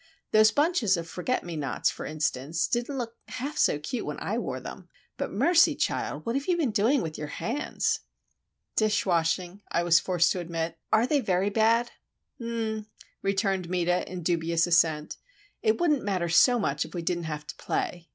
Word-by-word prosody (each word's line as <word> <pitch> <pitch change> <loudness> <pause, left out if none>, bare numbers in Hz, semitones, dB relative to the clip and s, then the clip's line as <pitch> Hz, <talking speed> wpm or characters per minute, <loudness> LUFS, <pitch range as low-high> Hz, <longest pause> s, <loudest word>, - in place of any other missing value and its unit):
Those 215 0 +6
bunches 285 - +2
of 165 0 -5
forget 185 +10 -2
me 175 -1 -6
nots, 140 -4 0
for - - -7
instance, 155 +1 -1
didn't 240 +4 -2
look 235 -2 -5
half 285 +4 -5
so 295 - +3
cute 150 - -4
when - - -5
I - - -2
wore - - -3
them. - - -9 0.3
But, - - -4
mercy, 345 0 +4
child—what 230 +1 -2
have 275 +1 -2
you 355 -2 +2
been 295 -9 +1
doing 230 +6 +2
with 155 -1 -5
your 150 - -4
hands?" 250 - -2 0.8
"Dish 210 -1 +2
washing," 175 +2 0
I 170 - +1
was 170 -1 +5
forced 175 -2 +2
to 185 - -1
admit. 165 -1 -4
"Are 220 +2 +4
they 290 +3 +2
very 195 -3 +1
bad?" 230 +3 +3 0.5
"H'm'm," 225 -2 -3 0.3
returned 195 -2 0
Meta, 180 0 0
in 180 -2 -5
dubious 170 0 +1
assent. 160 -3 +2 0.4
"It 435 -3 +2
wouldn't 305 -6 +2
matter 185 -4 -1
so 245 +9 +5
much 150 -10 0
if 160 - -10
we 170 - -3
didn't 175 0 -1
have 150 -1 -5
to - - -8
play. 175 -2 -3
190 Hz, 180 wpm, -27 LUFS, 170-235 Hz, 0.8 s, Those